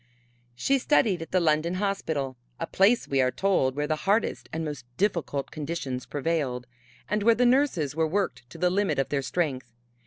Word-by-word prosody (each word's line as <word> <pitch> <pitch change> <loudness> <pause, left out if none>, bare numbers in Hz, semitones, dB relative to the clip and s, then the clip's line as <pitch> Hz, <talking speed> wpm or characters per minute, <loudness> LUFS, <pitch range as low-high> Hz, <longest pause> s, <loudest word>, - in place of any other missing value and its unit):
She 270 - +2
studied 225 - +2
at 165 - -7
the 185 - +2
London 165 +1 +1
Hospital 160 -9 -2 0.2
a 165 - -1
place, 205 +8 +3
we 135 -1 +2
are 130 - +3
told, 130 -4 +1
where 145 +1 -1
the 155 +1 -1
hardest 215 +3 +1
and 160 0 -3
most 145 -5 -5
difficult 170 -8 -1
conditions 145 -4 -4
prevailed, 140 -5 -1 0.4
and 210 +1 0
where 230 +2 +5
the 245 - +3
nurses 240 - +2
were 160 0 +2
worked 155 -9 -2
to 165 - -11
the 180 +1 +2
limit 190 -6 +1
of 135 - 0
their 140 -1 0
strength. 135 -4 -2
165 Hz, 185 wpm, -27 LUFS, 140-195 Hz, 0.4 s, where